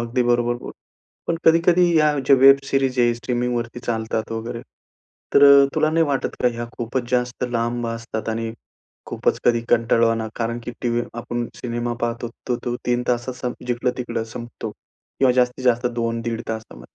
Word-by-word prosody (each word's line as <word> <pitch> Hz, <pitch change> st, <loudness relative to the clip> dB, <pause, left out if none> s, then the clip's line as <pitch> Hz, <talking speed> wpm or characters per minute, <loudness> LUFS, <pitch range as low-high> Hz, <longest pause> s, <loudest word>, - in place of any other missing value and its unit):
अगदी 120 Hz, +2 st, 0 dB
बरोबर 120 Hz, 0 st, +2 dB
बोल -, -, -7 dB, 0.5 s
पण 165 Hz, -, 0 dB
कधी-कधी 170 Hz, +1 st, +4 dB
या 150 Hz, -2 st, +3 dB
जे 140 Hz, -, +7 dB
वेब 135 Hz, +1 st, +7 dB
सिरीज 135 Hz, -2 st, 0 dB
आहे, 120 Hz, -1 st, +3 dB
स्ट्रीमिंगवरती 120 Hz, 0 st, -2 dB
चालतात 110 Hz, -1 st, -2 dB
वगैरे, 115 Hz, +1 st, -4 dB, 0.7 s
तर -, -, +6 dB
अ, 140 Hz, 0 st, +8 dB
तुला 155 Hz, -, +2 dB
नाही 165 Hz, 0 st, +3 dB
वाटत 140 Hz, -2 st, -1 dB
का 125 Hz, -, +5 dB
ह्या 120 Hz, 0 st, -5 dB
खूपच 120 Hz, +1 st, -3 dB
जास्त 125 Hz, 0 st, 0 dB
लांब 120 Hz, 0 st, -1 dB
असतात? 115 Hz, -1 st, -5 dB
आणि 115 Hz, 0 st, -2 dB, 0.5 s
खूपच -, -, 0 dB
कधी 120 Hz, -1 st, +3 dB
कंटाळवाना? 115 Hz, -1 st, +2 dB
कारण 115 Hz, 0 st, -2 dB
की -, -, -4 dB
टीव्हीवर 120 Hz, 0 st, 0 dB
आपण 120 Hz, 0 st, -3 dB
सिनेमा 120 Hz, 0 st, -3 dB
पाहतोत 120 Hz, 0 st, -2 dB, 0.2 s
तर 125 Hz, -, +2 dB
तो 120 Hz, -1 st, -1 dB
3 120 Hz, 0 st, +1 dB
तासात 125 Hz, +1 st, -1 dB
संप 125 Hz, -1 st, -6 dB
जिकडं-तिकडं 120 Hz, -1 st, -2 dB
संपतो. 120 Hz, -1 st, -6 dB, 0.5 s
किंवा 130 Hz, -2 st, +4 dB
जास्तीत 125 Hz, +1 st, +1 dB
जास्त 125 Hz, 0 st, +3 dB
2 115 Hz, 0 st, -1 dB
दीड 115 Hz, 0 st, -3 dB
तासामध्ये. 110 Hz, 0 st, -7 dB
120 Hz, 165 wpm, -22 LUFS, 115-125 Hz, 0.7 s, अ